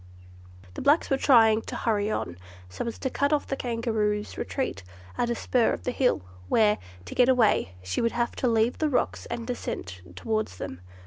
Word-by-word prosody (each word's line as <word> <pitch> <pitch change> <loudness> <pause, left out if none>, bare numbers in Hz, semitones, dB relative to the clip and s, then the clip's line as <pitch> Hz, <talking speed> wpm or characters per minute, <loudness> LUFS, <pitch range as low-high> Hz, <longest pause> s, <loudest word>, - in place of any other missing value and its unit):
The - - -6
blacks 290 +3 +3
were 270 - +4
trying 225 -5 +5
to - - -7
hurry 210 -2 0
on, 90 - -3 0.3
so 90 - -5
as 230 - -4
to 265 - -2
cut 280 +1 +1
off 300 -1 +2
the 270 - -2
Kangaroo's 225 -4 -1
retreat 260 - -3 0.3
at 240 - 0
a 235 - 0
spur 240 0 +2
of - - -5
the 250 - -1
hill, 250 - +1 0.3
where, 210 -2 +4 0.3
to - - -7
get 250 0 +4
away, 215 - +3
she 95 0 -2
would 230 - +1
have 240 0 -1
to 255 - +1
leave 230 0 +2
the 310 - +2
rocks 255 - -1
and 235 -1 -4
descend 90 - -5
towards 215 - -2
them. 90 0 -6
230 Hz, 195 wpm, -27 LUFS, 210-250 Hz, 0.3 s, trying